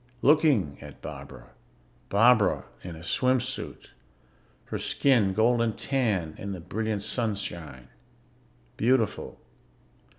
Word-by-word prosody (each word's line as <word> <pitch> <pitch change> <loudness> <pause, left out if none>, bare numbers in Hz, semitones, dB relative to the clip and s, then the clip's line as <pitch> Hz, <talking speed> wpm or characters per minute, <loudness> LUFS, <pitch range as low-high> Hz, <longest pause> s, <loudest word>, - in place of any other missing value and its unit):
Looking 140 - +3
at 75 -2 -11
Barbara 60 -2 -10 0.6
Barbara 110 +1 +4 0.2
in 90 -2 -7
a 80 - -11
swim 130 +8 +2
suit 130 +2 -6 0.7
her - - -4
skin 120 -9 +3
golden 115 0 +3
tan 105 - -1
in 100 0 -4
the 90 - -6
brilliant 105 +4 -3
sunshine, 95 - -3 0.9
beautiful. 115 -1 +1
110 Hz, 100 wpm, -27 LUFS, 90-125 Hz, 0.9 s, Barbara